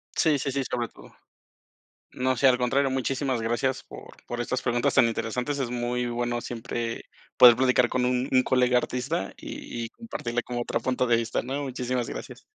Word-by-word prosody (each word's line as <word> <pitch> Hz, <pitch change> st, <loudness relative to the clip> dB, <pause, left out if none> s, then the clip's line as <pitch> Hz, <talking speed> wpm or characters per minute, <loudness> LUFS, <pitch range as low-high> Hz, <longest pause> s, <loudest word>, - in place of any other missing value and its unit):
Sí 155 Hz, -4 st, +3 dB
sí 140 Hz, 0 st, -2 dB
sí, 135 Hz, 0 st, -1 dB
sobre 120 Hz, -2 st, -1 dB
todo. -, -, -16 dB, 1.0 s
No, 130 Hz, 0 st, 0 dB
sí, 135 Hz, -, +2 dB
al 125 Hz, -1 st, +6 dB
contrario, 135 Hz, +2 st, +1 dB
muchísimas 130 Hz, -1 st, -1 dB
gracias 120 Hz, +4 st, -1 dB
por -, -, -11 dB, 0.2 s
por 120 Hz, 0 st, -5 dB
estas 130 Hz, +2 st, -2 dB
preguntas 120 Hz, -1 st, +1 dB
tan -, -, +6 dB
interesantes. 125 Hz, +5 st, -2 dB
Es 125 Hz, -3 st, -1 dB
muy 120 Hz, 0 st, -1 dB
bueno 120 Hz, 0 st, -1 dB
siempre 115 Hz, 0 st, -4 dB, 0.3 s
poder 120 Hz, -2 st, +10 dB
platicar 125 Hz, -1 st, +3 dB
con 125 Hz, -1 st, 0 dB
un 125 Hz, +1 st, +1 dB
un 130 Hz, -1 st, +4 dB
colega 125 Hz, -1 st, +3 dB
artista 125 Hz, -3 st, -2 dB
y 120 Hz, -1 st, -6 dB
y -, -, -7 dB
compartirle 120 Hz, -, -4 dB
como 120 Hz, -1 st, -3 dB
otro -, -, -1 dB
punto 125 Hz, -1 st, 0 dB
de 115 Hz, -1 st, +4 dB
vista, 115 Hz, 0 st, -1 dB
¿no? 135 Hz, +4 st, -3 dB
Muchísimas 125 Hz, -2 st, -2 dB
gracias. -, -, -8 dB
125 Hz, 185 wpm, -26 LUFS, 120-130 Hz, 1.0 s, poder